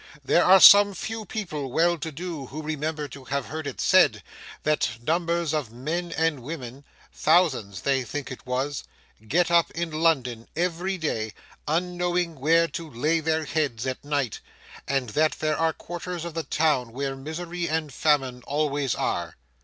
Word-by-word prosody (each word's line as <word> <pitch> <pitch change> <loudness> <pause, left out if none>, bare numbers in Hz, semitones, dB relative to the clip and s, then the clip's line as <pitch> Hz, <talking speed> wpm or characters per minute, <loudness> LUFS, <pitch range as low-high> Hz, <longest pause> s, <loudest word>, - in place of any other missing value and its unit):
There 175 - +4
are 190 +1 +7
some 200 +1 +9
few 220 +4 -5
people 155 - -4
well 170 +5 +3
to 160 -1 -5
do, 160 -3 -6
who 155 +4 -7
remember 155 0 -3
to 135 0 -11
have 140 0 -2
heard 155 +1 -5
it 140 - -6
said, - - +4 0.4
that 145 -6 0
numbers 170 -1 0
of 145 -8 -2
men 160 +8 -3
and 160 -4 0
women—thousands, 135 - -1
they 135 +1 +1
think 140 +3 -5
it 130 - -8
was—get 135 +3 -2
up 170 -2 +4
in 170 0 -4
London 135 -8 0
every 180 +3 -1
day, 110 - -2 0.3
unknowing 175 0 -1
where 165 +4 +4
to 165 -2 -6
lay 150 +6 +1
their 160 0 0
heads 140 -7 -1
at 130 -1 -4
night; 145 -6 -1 0.5
and 135 -3 0
that 155 +6 +2
there 155 -1 -1
are 165 +1 +2
quarters 175 0 -6
of 170 - -6
the 165 - -2
town 150 -8 0
where 135 +1 -3
misery 170 +5 -4
and 155 -3 -2
famine 135 -4 +1
always 145 -3 0
are. - - -2
155 Hz, 160 wpm, -25 LUFS, 135-170 Hz, 0.5 s, some